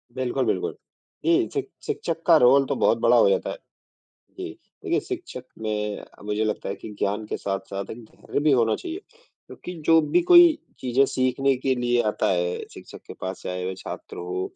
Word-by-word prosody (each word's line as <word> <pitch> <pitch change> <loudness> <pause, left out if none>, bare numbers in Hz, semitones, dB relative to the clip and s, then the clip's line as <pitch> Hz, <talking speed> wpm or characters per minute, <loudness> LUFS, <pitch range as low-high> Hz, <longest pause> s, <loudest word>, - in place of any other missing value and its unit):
बिल्कुल, 130 0 -1
बिल्कुल 435 - -1 0.5
ए, 340 +1 +3
शिक 405 -1 -3 0.2
शिक्षक 170 - -3
का 165 - +8
रोल 135 +1 +6
तो - - -1
बहुत - - +3
बड़ा - - +4
हो - - +6
जाता 485 0 0
है। - - -5 0.8
जी, 370 -1 -4 0.4
देखिए, - - +1
शिक्षक 360 - -7
में 105 -1 -3 0.2
मुझे 105 +1 -1
लगता 105 - -2
है 100 - -2
कि - - -9
ज्ञान 105 +2 -1
के - - -3
साथ-साथ 100 0 -4
एक 115 0 -8
धैर्य 125 - -5
भी 150 0 +3
होना 115 -3 +3
चाहिए, 350 0 -6 0.5
क्योंकि 180 - -9
जो 165 0 +7
भी 350 - +2
कोई 345 -3 +8 0.2
चीज़ें 130 +2 +3
सीखने 130 +1 +1
के 130 +1 0
लिए 120 -1 +1
आता - - -1
है 90 -1 0 0.2
शिक्षक - - -11
के - - -9
पास, 95 0 -5
चाहे 90 0 -4
वो 95 - -4
छात्र 95 - -8
हो 90 +1 -3
130 Hz, 190 wpm, -24 LUFS, -, 0.8 s, का